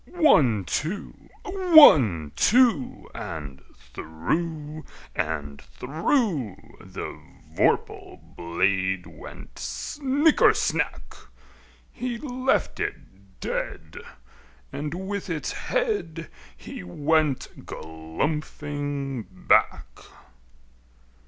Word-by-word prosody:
One, 145 Hz, -, +4 dB
two! 170 Hz, -, -4 dB, 0.2 s
One, 290 Hz, -, +6 dB
two! 235 Hz, -, +3 dB
And 75 Hz, -5 st, -7 dB, 0.3 s
through 150 Hz, -, -3 dB, 0.3 s
and 75 Hz, -3 st, -3 dB
through 155 Hz, -, -1 dB, 0.3 s
The -, -, -7 dB, 0.3 s
vorpal -, -, 0 dB, 0.2 s
blade 95 Hz, +2 st, 0 dB
went -, -, -12 dB
snicker 280 Hz, -, +2 dB
snack! -, -, -1 dB, 0.8 s
He 245 Hz, -1 st, -4 dB
left 255 Hz, -1 st, -1 dB
it 95 Hz, 0 st, -7 dB
dead, 80 Hz, -1 st, -4 dB, 0.8 s
and 150 Hz, +1 st, -4 dB
with 190 Hz, +1 st, -4 dB
its 160 Hz, -3 st, -2 dB
head 420 Hz, -, -2 dB, 0.3 s
He -, -, -8 dB
went 145 Hz, -, 0 dB
galumphing 140 Hz, -, -4 dB
back. -, -, +1 dB
145 Hz, 75 wpm, -25 LUFS, -, 0.8 s, One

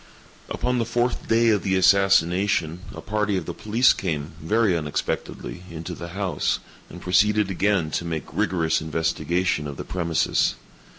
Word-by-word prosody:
Upon 125 Hz, 0 st, -1 dB
the 115 Hz, -, 0 dB
fourth 120 Hz, +2 st, -1 dB
day 115 Hz, +1 st, +4 dB
of 105 Hz, -3 st, +3 dB
the 95 Hz, -1 st, 0 dB
assassination, 95 Hz, -2 st, +3 dB
a -, -, -9 dB
party 105 Hz, -1 st, -1 dB
of -, -, -4 dB
the 85 Hz, -, -5 dB
police 115 Hz, +7 st, +3 dB
came, 80 Hz, -5 st, -3 dB
very 105 Hz, +3 st, +2 dB
unexpectedly, 80 Hz, +2 st, -3 dB
into 85 Hz, +2 st, -6 dB
the 85 Hz, 0 st, -7 dB
house, 95 Hz, -7 st, 0 dB, 0.3 s
and 90 Hz, -, -10 dB
proceeded 105 Hz, +3 st, +2 dB
again 95 Hz, -4 st, +1 dB
to -, -, -1 dB
make 80 Hz, -2 st, -4 dB
rigorous 80 Hz, -3 st, +1 dB
investigation 80 Hz, +1 st, -1 dB
of 70 Hz, -1 st, -7 dB
the -, -, -6 dB
premises. 85 Hz, -4 st, 0 dB
90 Hz, 155 wpm, -24 LUFS, 80-105 Hz, 0.3 s, day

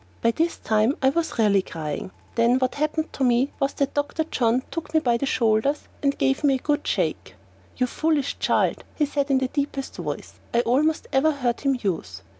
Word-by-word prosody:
By 230 Hz, -, +4 dB
this 330 Hz, +7 st, 0 dB
time 220 Hz, +5 st, +1 dB
I 265 Hz, -, +6 dB
was 325 Hz, +4 st, -1 dB
really 205 Hz, -3 st, +4 dB
crying. 155 Hz, -2 st, -5 dB, 0.2 s
Then 235 Hz, +2 st, +3 dB
what 255 Hz, -1 st, 0 dB
happened 305 Hz, +2 st, -1 dB
to 270 Hz, -, -2 dB
me 250 Hz, +2 st, +3 dB
was 275 Hz, -1 st, 0 dB
that 280 Hz, -2 st, -1 dB
Dr. 290 Hz, +2 st, -1 dB
John 250 Hz, -4 st, +1 dB
took 325 Hz, -2 st, -5 dB
me -, -, +7 dB
by 240 Hz, -6 st, +2 dB
the 275 Hz, -, -2 dB
shoulders 230 Hz, +5 st, +1 dB
and 280 Hz, -1 st, +1 dB
gave 270 Hz, +2 st, +1 dB
me 280 Hz, -2 st, +4 dB
one 260 Hz, -, -5 dB
good -, -, -12 dB
shake. -, -, -1 dB, 0.4 s
"You 255 Hz, -, +2 dB
foolish 295 Hz, +2 st, 0 dB
child," -, -, +1 dB
he 300 Hz, -, +2 dB
said 285 Hz, 0 st, -1 dB
in 270 Hz, -, +4 dB
the 260 Hz, 0 st, +1 dB
deepest 280 Hz, 0 st, -3 dB
voice -, -, -6 dB, 0.2 s
I 235 Hz, -, +5 dB
almost 290 Hz, +7 st, +1 dB
ever 280 Hz, +4 st, +4 dB
heard 250 Hz, -5 st, -1 dB
him 275 Hz, -2 st, +1 dB
use. 105 Hz, -, -3 dB
270 Hz, 205 wpm, -24 LUFS, 235-290 Hz, 0.4 s, me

